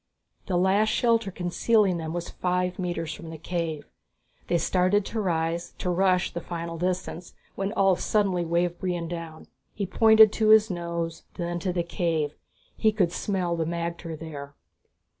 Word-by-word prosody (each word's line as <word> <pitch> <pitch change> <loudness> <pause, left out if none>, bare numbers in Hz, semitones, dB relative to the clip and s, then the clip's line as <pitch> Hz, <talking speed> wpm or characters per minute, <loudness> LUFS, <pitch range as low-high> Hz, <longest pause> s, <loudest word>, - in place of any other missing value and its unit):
The 185 -4 +1
last 195 +4 +3
shelter 230 -2 +2
concealing 185 +2 +1
them 160 -1 -4
was 175 0 -4
five 180 0 -1
metres 175 -3 -2
from 170 -5 -9
the 160 - -7
cave. 165 -2 -3 0.6
They 175 - +2
started 185 +4 +2
to 225 - -3
rise, 170 -2 -1
to 180 - -1
rush 185 0 +2
the 170 - -4
final 170 0 -5
distance, 180 -1 -3 0.2
when 195 +1 -2
Ulv 195 -2 +3
suddenly 195 -5 +1
waved 170 +1 0
Brion 175 -3 -2
down. 165 -2 -7 0.3
He 200 - -2
pointed 220 +2 +6
to 220 - +1
his 220 -1 +6
nose, 170 -1 -3
then 175 -1 -3
to 185 +1 -1
the 175 -1 -1
cave. 165 -4 -1 0.4
He 220 - +3
could 190 -6 +1
smell 180 -2 -1
the 165 -1 -1
magter 170 0 -4
there. 145 -3 -8
175 Hz, 160 wpm, -26 LUFS, 170-195 Hz, 0.6 s, pointed